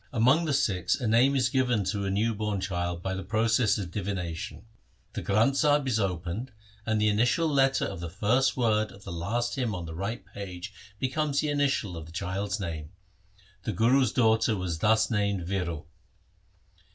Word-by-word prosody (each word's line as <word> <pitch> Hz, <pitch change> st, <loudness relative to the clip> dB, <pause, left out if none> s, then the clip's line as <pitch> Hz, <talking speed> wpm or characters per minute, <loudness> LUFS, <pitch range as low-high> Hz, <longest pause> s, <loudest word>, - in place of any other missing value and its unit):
Among 130 Hz, +7 st, +3 dB
the 150 Hz, -, 0 dB
Sikhs 95 Hz, -9 st, +1 dB
a 120 Hz, -, -2 dB
name 120 Hz, +5 st, +4 dB
is 125 Hz, -2 st, +2 dB
given 125 Hz, -5 st, +1 dB
to 100 Hz, +1 st, -2 dB
a -, -, -1 dB
new 110 Hz, +4 st, +1 dB
born 105 Hz, -1 st, -2 dB
child 90 Hz, -2 st, -3 dB
by 95 Hz, -, -2 dB
a 95 Hz, -, -3 dB
process 110 Hz, +3 st, +2 dB
of 95 Hz, -5 st, -5 dB
divination. 90 Hz, -2 st, -4 dB, 0.5 s
The -, -, -4 dB
Granth 115 Hz, +7 st, +2 dB
Sahib 145 Hz, -2 st, +3 dB
is 115 Hz, -4 st, +1 dB
opened 95 Hz, +5 st, -2 dB, 0.4 s
and 110 Hz, -1 st, +1 dB
the 105 Hz, -, +3 dB
initial 120 Hz, +10 st, +2 dB
letter 135 Hz, -2 st, +2 dB
of 95 Hz, -3 st, -5 dB
the 85 Hz, 0 st, -5 dB
first 115 Hz, +10 st, +1 dB
word 110 Hz, -3 st, +1 dB
of 100 Hz, -, -15 dB
the 95 Hz, -, -7 dB
last 110 Hz, +9 st, -2 dB
hymn 120 Hz, -7 st, -1 dB
on 90 Hz, -2 st, -5 dB
the 80 Hz, -, -7 dB
right 100 Hz, +4 st, -4 dB
page 95 Hz, -3 st, -8 dB, 0.2 s
becomes 140 Hz, +4 st, 0 dB
the 150 Hz, -, -1 dB
initial 140 Hz, -10 st, 0 dB
of 80 Hz, -1 st, -8 dB
the -, -, -12 dB
child's 100 Hz, +4 st, -3 dB
name. 80 Hz, -5 st, -5 dB, 0.7 s
The 110 Hz, -, -3 dB
Guru's 120 Hz, +5 st, +3 dB
daughter 110 Hz, -2 st, +3 dB
was 90 Hz, -4 st, -3 dB
thus 110 Hz, +3 st, +3 dB
named 100 Hz, -4 st, 0 dB
Viro. 85 Hz, -4 st, -3 dB
105 Hz, 185 wpm, -28 LUFS, 95-125 Hz, 0.7 s, name